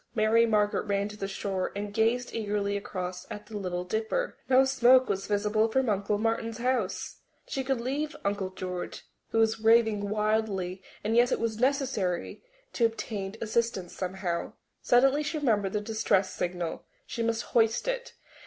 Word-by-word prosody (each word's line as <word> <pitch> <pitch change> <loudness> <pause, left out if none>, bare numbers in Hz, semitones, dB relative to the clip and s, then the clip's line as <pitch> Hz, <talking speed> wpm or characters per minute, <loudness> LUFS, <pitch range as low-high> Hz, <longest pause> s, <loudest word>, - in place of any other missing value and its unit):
Mary 225 +1 +4
Margaret 210 -1 +1
ran 200 0 +1
to 210 - -9
the 195 -2 -4
shore 195 -1 -2
and 205 0 -4
gazed 230 +3 +1
eagerly 205 -2 -1
across 185 -2 -5
at 210 - -7
the 220 - -10
Little 180 -3 -2
Dipper. 220 +4 -2
No 265 +1 +6
smoke 260 -1 +5
was 195 0 -2
visible 210 +1 +2
from 255 +2 +1
Uncle 205 0 +1
Martin's 225 +1 -1
house! 240 -5 -1 0.3
She 270 - -2
could 265 0 0
not 235 - -6
leave 295 +4 -2
Uncle 200 -1 0
George, 180 -1 -5 0.3
who - - -1
was 225 0 +3
raving 220 -2 +4
wildly, 210 -3 0 0.2
and 220 +2 0
yet 240 +2 +5
it - - +1
was 225 -1 -2
necessary 255 -9 0 0.3
to 235 - 0
obtain 210 -3 -3
assistance 225 -4 -1
somehow. 185 -2 -3 0.3
Suddenly 270 +4 +4
she 310 +2 -2
remembered 210 -9 +1
the 210 - 0
distress 205 -3 +1
signal. 175 -2 -3 0.2
She 240 - -4
must 230 0 0
hoist 225 - +3
it. - - -3
215 Hz, 165 wpm, -28 LUFS, 200-235 Hz, 0.3 s, No